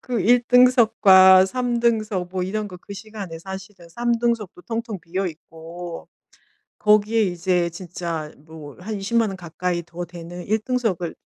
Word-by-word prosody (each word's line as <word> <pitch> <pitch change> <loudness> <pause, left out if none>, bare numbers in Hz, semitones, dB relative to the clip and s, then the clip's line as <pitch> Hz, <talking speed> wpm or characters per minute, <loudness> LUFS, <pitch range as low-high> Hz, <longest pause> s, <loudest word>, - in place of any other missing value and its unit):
그 245 -3 -3
1 240 +3 +4
등석과 215 -7 +6
3 245 +1 -1
등석 215 -6 0
뭐 185 -1 -2
이런 210 +3 -3
거 180 - -10
그 200 - -11
시간에 200 -5 -8
사실은 190 0 -10
3 240 +7 -1
등석도 230 -6 -2
텅텅 230 -2 -4
비어 185 +4 -3
있고 165 +2 -10 0.7
거기에 215 +1 +3
이제 175 -2 0
진짜 170 -3 -6
뭐 155 -1 -12
한 215 +3 -5
200,000 225 +2 +1
원 195 - -6
가까이 175 0 -3
더 175 +1 -7
되는 175 +1 -9
1 220 +2 +1
등석을 215 -8 -2
190 Hz, 240 characters per minute, -22 LUFS, 175-220 Hz, 0.7 s, 등석과